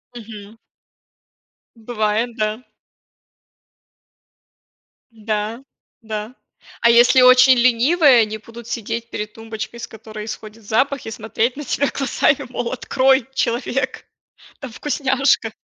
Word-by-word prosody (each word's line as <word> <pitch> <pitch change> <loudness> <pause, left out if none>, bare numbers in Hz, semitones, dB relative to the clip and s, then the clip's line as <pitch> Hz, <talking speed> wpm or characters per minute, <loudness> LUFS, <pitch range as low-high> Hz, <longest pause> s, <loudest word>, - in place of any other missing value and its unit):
Мгм. 215 -1 -11 1.2
М, 225 - -19
бывает, 225 0 -1
да. 215 +3 -2 2.5
Да, 220 +1 -4 0.4
да. 220 +1 -6 0.5
А 235 - +5
если 240 +2 +6
очень 255 0 +7
ленивые, 255 +2 +4
они 215 0 -2
будут 230 +1 -13
сидеть 230 +1 -4
перед 210 0 -6
тумбочкой, 225 +1 -7
с - - -6
которой 215 -1 -9
исходит 215 0 -9
запах, 260 +6 0
и 225 - -6
смотреть 225 +4 -2
на 295 - -5
тебя 285 +3 0
глазами, 275 0 0
мол, 245 -1 -4
открой, 265 0 +1
человек, 260 +2 -2 0.5
там 265 -5 -8
вкусняшка. 270 -3 0
230 Hz, 110 wpm, -20 LUFS, 220-255 Hz, 2.5 s, очень